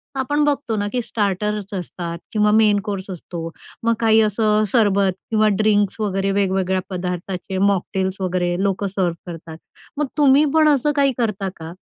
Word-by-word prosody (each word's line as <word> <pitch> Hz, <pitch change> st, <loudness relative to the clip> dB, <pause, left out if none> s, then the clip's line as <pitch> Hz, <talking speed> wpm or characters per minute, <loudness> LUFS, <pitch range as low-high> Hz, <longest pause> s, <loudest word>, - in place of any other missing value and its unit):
आपण 290 Hz, +3 st, 0 dB
बघतो 285 Hz, -6 st, 0 dB
ना 205 Hz, 0 st, -1 dB
की 250 Hz, -, 0 dB
स्टार्टर्स 210 Hz, -1 st, -2 dB
असतात 175 Hz, -2 st, -5 dB
किंवा 210 Hz, -1 st, +2 dB
मेन 210 Hz, -2 st, +4 dB
कोर्स 195 Hz, -2 st, -4 dB
असतो 170 Hz, -2 st, -6 dB, 0.3 s
मग 230 Hz, 0 st, +3 dB
काही 225 Hz, -1 st, +4 dB
असं 215 Hz, 0 st, +2 dB
सरबत 200 Hz, -5 st, +3 dB, 0.2 s
किंवा 215 Hz, -1 st, +3 dB
ड्रिंक्स 205 Hz, -1 st, +2 dB
वगैरे 195 Hz, -1 st, 0 dB
वेगवेगळ्या 190 Hz, -1 st, 0 dB
पदार्थाचे 180 Hz, +1 st, -4 dB
मॉकटेल्स 190 Hz, 0 st, 0 dB
वगैरे, 180 Hz, -1 st, 0 dB
लोक 200 Hz, 0 st, 0 dB
सर्व्ह 180 Hz, -2 st, -2 dB
करतात. 165 Hz, -1 st, -9 dB, 0.4 s
मग 295 Hz, -, +1 dB
तुम्ही 285 Hz, 0 st, +5 dB
पण 315 Hz, -1 st, +5 dB
असं 295 Hz, 0 st, +2 dB
काही 280 Hz, -2 st, +3 dB
करता 210 Hz, -5 st, -1 dB
का? 165 Hz, +1 st, -8 dB
200 Hz, 155 wpm, -20 LUFS, 185-220 Hz, 0.4 s, तुम्ही